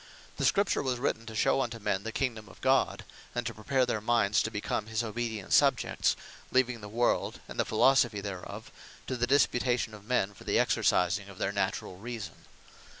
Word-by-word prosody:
The -, -, 0 dB
Scripture 200 Hz, 0 st, +2 dB
was 130 Hz, -3 st, -1 dB
written 120 Hz, -2 st, -2 dB
to 110 Hz, -, -7 dB
shew 125 Hz, -, +3 dB
unto 120 Hz, -2 st, -3 dB
men 100 Hz, -3 st, -1 dB
the 115 Hz, +2 st, -5 dB
kingdome 115 Hz, -5 st, -2 dB
of -, -, -16 dB
God; -, -, +2 dB, 0.3 s
and 120 Hz, 0 st, -1 dB
to 115 Hz, -, -3 dB
prepare 130 Hz, +4 st, +1 dB
their 110 Hz, -, -1 dB
mindes 110 Hz, 0 st, +3 dB
to -, -, -1 dB
become 105 Hz, 0 st, -3 dB
his 110 Hz, +1 st, -1 dB
obedient 110 Hz, -2 st, -3 dB
subjects; -, -, +3 dB, 0.4 s
leaving 125 Hz, -3 st, +2 dB
the 105 Hz, -, -8 dB
world, 120 Hz, +3 st, 0 dB
and -, -, -8 dB
the -, -, +3 dB
Philosophy 120 Hz, -6 st, +3 dB
thereof, 100 Hz, -2 st, -7 dB, 0.3 s
to 130 Hz, -, -3 dB
the 120 Hz, 0 st, 0 dB
disputation 125 Hz, -3 st, +2 dB
of 105 Hz, -1 st, -11 dB
men, 105 Hz, -3 st, 0 dB
for -, -, -14 dB
the -, -, +1 dB
exercising 100 Hz, +3 st, +2 dB
of 100 Hz, -, -12 dB
their 95 Hz, -, -1 dB
naturall 95 Hz, -2 st, -2 dB
Reason. 115 Hz, -1 st, -7 dB
115 Hz, 190 wpm, -30 LUFS, 105-125 Hz, 0.4 s, shew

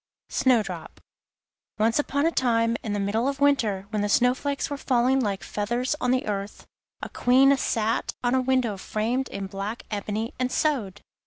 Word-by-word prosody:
SNOWDROP 205 Hz, -10 st, 0 dB, 0.8 s
Once 225 Hz, +5 st, +2 dB
upon 285 Hz, 0 st, 0 dB
a 330 Hz, -, +3 dB
time, 230 Hz, -5 st, +2 dB
in 215 Hz, -, -3 dB
the 205 Hz, -, -1 dB
middle 210 Hz, +5 st, 0 dB
of 280 Hz, 0 st, -2 dB
winter 225 Hz, -9 st, +2 dB
when 210 Hz, -2 st, -1 dB
the 205 Hz, -, -1 dB
snow 250 Hz, +4 st, +4 dB
flakes 280 Hz, +1 st, -2 dB
were 285 Hz, -, -4 dB
falling 260 Hz, -1 st, +2 dB
like 205 Hz, -6 st, -2 dB
feathers 240 Hz, +7 st, -1 dB
on 250 Hz, -, +1 dB
the 255 Hz, 0 st, +1 dB
earth, 200 Hz, -1 st, -4 dB, 0.4 s
a -, -, -4 dB
Queen 265 Hz, +3 st, +4 dB
sat 225 Hz, -4 st, -1 dB
at 245 Hz, 0 st, +1 dB
a 260 Hz, -, +3 dB
window 255 Hz, -5 st, +1 dB
framed 230 Hz, +7 st, -2 dB
in 200 Hz, -, -5 dB
black 200 Hz, +4 st, -5 dB
ebony 215 Hz, +2 st, -3 dB
and 255 Hz, 0 st, 0 dB
sewed. 225 Hz, -11 st, -1 dB
235 Hz, 175 wpm, -25 LUFS, 205-260 Hz, 0.8 s, snow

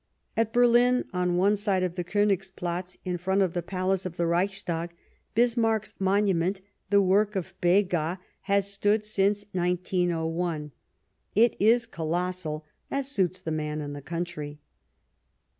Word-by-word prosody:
At 225 Hz, -1 st, +1 dB
Berlin, 245 Hz, +1 st, +4 dB
on 180 Hz, -1 st, +1 dB
one 200 Hz, +3 st, +4 dB
side 200 Hz, -3 st, 0 dB
of 180 Hz, -2 st, -1 dB
the 180 Hz, -1 st, -3 dB
Konigsplatz, 185 Hz, -2 st, -1 dB
in 180 Hz, -1 st, -2 dB
front 190 Hz, +3 st, +2 dB
of 180 Hz, -3 st, -1 dB
the 175 Hz, -, -1 dB
Palace 185 Hz, +1 st, -1 dB
of 185 Hz, -1 st, -6 dB
the 170 Hz, -, +1 dB
Reichstag, 175 Hz, -1 st, -1 dB, 0.4 s
Bismarck's 225 Hz, -2 st, +2 dB
monument, 190 Hz, -1 st, +2 dB, 0.3 s
the 200 Hz, 0 st, +5 dB
work 205 Hz, +3 st, +3 dB
of 190 Hz, -1 st, -3 dB
Begas, 175 Hz, -2 st, +2 dB, 0.3 s
has 200 Hz, 0 st, +2 dB
stood 205 Hz, +2 st, +2 dB
Bismarck 205 Hz, -2 st, +2 dB
°^ -, -, -8 dB
since 205 Hz, 0 st, -10 dB
1901; 175 Hz, -3 st, -1 dB, 0.6 s
it 230 Hz, +3 st, +5 dB
is 230 Hz, +3 st, +4 dB
colossal, 170 Hz, -4 st, -3 dB, 0.2 s
as 275 Hz, 0 st, -1 dB
suits 185 Hz, -, +1 dB
the 160 Hz, -, -4 dB
man 155 Hz, -1 st, -2 dB
and 145 Hz, -1 st, -5 dB
the 145 Hz, -, -7 dB
country. 155 Hz, -2 st, -5 dB
185 Hz, 145 wpm, -27 LUFS, 175-205 Hz, 0.6 s, the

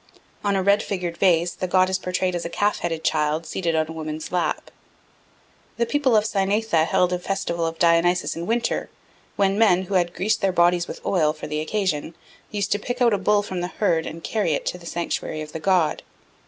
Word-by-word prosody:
On 200 Hz, -1 st, +1 dB
a 190 Hz, -, +1 dB
red 200 Hz, +2 st, +4 dB
figured 180 Hz, -5 st, -4 dB
vase 175 Hz, -2 st, +3 dB
the 185 Hz, -, -4 dB
god 185 Hz, +1 st, +3 dB
is 190 Hz, 0 st, -1 dB
portrayed 180 Hz, 0 st, -1 dB
as 175 Hz, -, -2 dB
a 170 Hz, -, -4 dB
calf 205 Hz, +4 st, 0 dB
headed 165 Hz, -2 st, -3 dB
child 155 Hz, 0 st, 0 dB
seated 170 Hz, -2 st, -2 dB
on 160 Hz, 0 st, +2 dB
a -, -, -7 dB
woman's 155 Hz, -1 st, -6 dB
lap. 180 Hz, -1 st, -1 dB, 1.1 s
The 235 Hz, -, +2 dB
people 270 Hz, -1 st, +2 dB
of 210 Hz, -, +4 dB
Cynaetha 200 Hz, -4 st, +1 dB
held 180 Hz, 0 st, +2 dB
a 180 Hz, -, -1 dB
festival 175 Hz, -3 st, -2 dB
of 165 Hz, 0 st, -5 dB
Dionysus 170 Hz, +1 st, +2 dB
in 170 Hz, +1 st, -5 dB
winter, 235 Hz, +1 st, -1 dB, 0.5 s
when 195 Hz, +1 st, +1 dB
men, 185 Hz, -5 st, +4 dB
who 190 Hz, -, -6 dB
had 175 Hz, -2 st, +1 dB
greased 215 Hz, +3 st, 0 dB
their 195 Hz, -2 st, +2 dB
bodies 175 Hz, 0 st, +3 dB
with -, -, -9 dB
oil 155 Hz, -5 st, +2 dB
for 155 Hz, -, -8 dB
the 150 Hz, 0 st, -3 dB
occasion, 165 Hz, -3 st, -2 dB, 0.3 s
used 205 Hz, -1 st, -2 dB
to 205 Hz, -, +2 dB
pick 245 Hz, +4 st, -4 dB
out 240 Hz, -3 st, +4 dB
a 200 Hz, -, +1 dB
bull 205 Hz, +1 st, +2 dB
from 185 Hz, -3 st, -4 dB
the 175 Hz, -, -2 dB
herd 175 Hz, -4 st, 0 dB
and 165 Hz, +1 st, -8 dB
carry 205 Hz, -8 st, 0 dB
it -, -, -2 dB
to 180 Hz, -, -3 dB
the 170 Hz, -, -11 dB
sanctuary 165 Hz, -2 st, -3 dB
of 155 Hz, 0 st, -7 dB
the 160 Hz, -, -5 dB
god. 175 Hz, -2 st, +2 dB
180 Hz, 220 wpm, -23 LUFS, 165-200 Hz, 1.1 s, red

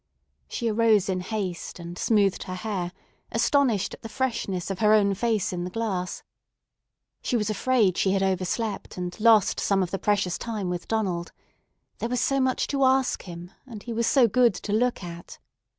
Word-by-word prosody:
She 235 Hz, -, -3 dB
arose 220 Hz, -3 st, +3 dB
in 185 Hz, -1 st, 0 dB
haste 185 Hz, -2 st, -4 dB
and 170 Hz, 0 st, -8 dB
smoothed 200 Hz, 0 st, +2 dB
her 185 Hz, -, -5 dB
hair, 185 Hz, -3 st, -3 dB, 0.4 s
astonished 250 Hz, -9 st, +2 dB
at -, -, -11 dB
the 225 Hz, -, -8 dB
freshness 225 Hz, -8 st, -2 dB
of 190 Hz, -, -4 dB
her 215 Hz, -1 st, +5 dB
own 200 Hz, -2 st, +4 dB
face 215 Hz, -2 st, 0 dB
in 175 Hz, -1 st, -3 dB
the 180 Hz, -, -4 dB
glass. 185 Hz, -3 st, -3 dB, 1.0 s
She 245 Hz, -, 0 dB
was 215 Hz, -1 st, -1 dB
afraid 215 Hz, -4 st, +2 dB
she 195 Hz, -, +2 dB
had 195 Hz, -1 st, +1 dB
overslept 190 Hz, +3 st, -2 dB
and 180 Hz, 0 st, -4 dB
lost 220 Hz, -3 st, +4 dB
some 195 Hz, -1 st, +2 dB
of 180 Hz, -, -4 dB
the 195 Hz, -, -2 dB
precious 200 Hz, -4 st, 0 dB
time 215 Hz, -5 st, -3 dB
with 175 Hz, -1 st, -5 dB
Donald. 185 Hz, -6 st, -1 dB, 0.7 s
There 230 Hz, -, -2 dB
was 250 Hz, 0 st, 0 dB
so 275 Hz, +3 st, +1 dB
much 260 Hz, -1 st, +1 dB
to 275 Hz, -1 st, +1 dB
ask 265 Hz, 0 st, +2 dB
him, 175 Hz, 0 st, -9 dB, 0.2 s
and 220 Hz, -5 st, -9 dB
he 235 Hz, -, -5 dB
was 230 Hz, 0 st, 0 dB
so 260 Hz, -4 st, +5 dB
good 240 Hz, -1 st, +3 dB
to 205 Hz, -, -4 dB
look 240 Hz, -2 st, +1 dB
at. 170 Hz, -1 st, -9 dB
210 Hz, 185 wpm, -26 LUFS, 185-230 Hz, 1.0 s, her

